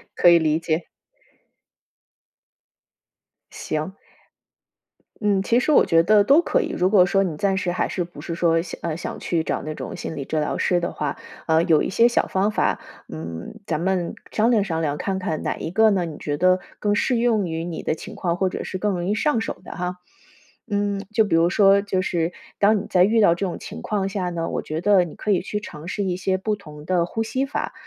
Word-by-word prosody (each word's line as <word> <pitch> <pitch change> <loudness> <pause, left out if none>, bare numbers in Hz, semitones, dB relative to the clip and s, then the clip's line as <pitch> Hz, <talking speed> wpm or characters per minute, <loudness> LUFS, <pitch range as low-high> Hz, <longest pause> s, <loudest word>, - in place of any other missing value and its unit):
可 175 - +6
以 170 -1 +7
理 155 -1 +1
解。 165 0 -1 2.7
行。 155 +4 -4 1.3
嗯， 200 -3 +2
其 235 +4 +3
实 250 - -1
我 - - +6
觉 165 0 +4
得 205 +4 +5
都 280 +10 +5
可 - - +1
以。 - - -3
如 180 +1 +1
果 190 -3 +6
说 195 +2 +2
你 175 -5 -3
暂 195 +4 0
时 180 -2 -1
还 - - -1
是 180 - -2
不 175 - -12
是 170 - -5
说， 165 -1 +2
想 165 - -8
呃， 165 -2 -2
想 170 - -6
去 165 -2 -1
找 - - -2
那 155 +1 -4
种 - - -6
心 - - -5
理 140 - -4
治 155 +3 -2
疗 150 - -1
师 180 - +2
的 175 - -3
话， 145 -2 -3 0.3
呃， 160 0 +3
有 165 -4 +3
一 - - -2
些 230 +5 +4
小 240 - +1
方 195 +2 +1
法， - - 0 0.3
嗯， 80 - -7
咱 160 -3 -1
们 185 -2 -1 0.2
商 225 +2 +2
量 225 -4 +3
商 165 -4 -2
量， 145 -2 -1
看 190 +2 -2
看 170 -5 -3
哪 - - -2
一 160 - -5
个 220 +4 +5
呢， 190 -4 +1
你 160 -3 -7
觉 145 -1 -3
得 185 +3 +4 0.2
更 205 -1 +1
适 245 +3 +1
用 230 -5 +2
于 165 0 -3
你 170 -2 -5
的 - - 0
情 - - -10
况 175 -2 -1
或 190 - +1
者 185 - -4
是 185 - -5
更 205 +2 0
容 175 -1 -3
易 - - +2
上 235 +1 +1
手 - - -5
的 - - -10
哈。 180 0 -3 0.7
嗯， 205 -1 0
就 220 0 +4
比 195 - +1
如 165 +1 +4
说 200 +1 +5
就 195 -2 -1
是， 170 -2 -1 0.3
当 210 +1 +4
你 200 - -6
在 180 - +4
遇 220 +4 +3
到 170 -5 +5
这 195 - -2
种 175 - -5
情 - - -8
况 200 -2 -1
下 190 -2 -2
呢， 170 -1 -3
我 - - -2
觉 155 +1 -4
得 195 -1 +4
你 170 - -8
可 210 - -2
以 190 - +2
去 210 +2 -3
尝 160 -6 -10
试 200 +2 -2
一 185 -2 -1
些 185 +1 0
不 210 +3 -1
同 150 -7 -12
的 175 -1 +1
呼 225 +5 -2
吸 260 +4 -1
法， 275 - -4
185 Hz, 250 characters per minute, -23 LUFS, 165-205 Hz, 2.7 s, 以